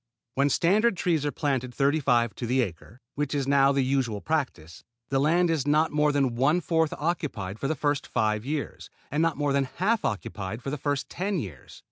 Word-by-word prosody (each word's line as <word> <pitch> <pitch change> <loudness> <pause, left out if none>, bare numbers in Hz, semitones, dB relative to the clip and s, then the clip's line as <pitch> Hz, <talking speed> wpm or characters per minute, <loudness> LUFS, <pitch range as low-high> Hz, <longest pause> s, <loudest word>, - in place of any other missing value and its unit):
When 140 +1 +2
standard 195 - +3
trees 160 -4 +1
are - - -1
planted 130 -5 -2
thirty 140 +2 +2
five 120 -6 +2
to 120 - -4
the 130 +2 +2
acre, 95 +5 -8
which 145 0 -2
is 140 -2 -1
now 140 0 +5
the 140 -1 +2
usual 130 -5 0
practice, 125 - -3 0.3
the 135 - +1
land 165 +4 +3
is 150 -4 -1
not 155 +2 +3
more 150 0 +2
than 135 -4 +1
one 140 +8 +3
fourth 160 -3 +1
occupied 140 - -3
for 135 - -1
the 155 - 0
first 145 0 -1
five 110 -2 0
years, 145 +2 -4 0.2
and 150 - +1
not 165 -1 +1
more 145 -1 0
than 140 -1 +2
half 215 +4 +1
occupied 105 +1 -4
for 135 - -3
the 150 - -4
first 145 0 -1
ten 195 +2 -2
years. 95 - -8
140 Hz, 205 wpm, -27 LUFS, 125-155 Hz, 0.3 s, now